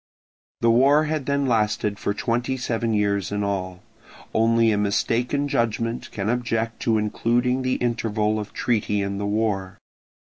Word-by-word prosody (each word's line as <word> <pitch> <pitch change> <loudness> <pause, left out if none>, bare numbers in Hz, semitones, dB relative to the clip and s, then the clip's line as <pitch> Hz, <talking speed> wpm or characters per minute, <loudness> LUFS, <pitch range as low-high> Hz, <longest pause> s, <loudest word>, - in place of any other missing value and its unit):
The 115 - +4
war 140 +6 +5
had 155 -3 -2
then 140 0 +1
lasted 105 -3 0
for - - -1
twenty 120 +5 -1
seven 115 -2 -1
years 100 -2 0
in 105 0 -1
all. 95 -2 -3 0.5
Only 115 0 +3
a 105 - +1
mistaken 120 +7 0
judgment 115 -2 -1
can 100 -1 -3
object 115 -1 -1
to 110 -1 +2
including 120 +4 0
the 130 0 0
interval 110 -3 0
of 105 -1 -6
treaty 105 -3 0
in 100 0 -3
the 100 - -2
war. 100 -3 -1
115 Hz, 150 wpm, -23 LUFS, 105-120 Hz, 0.5 s, war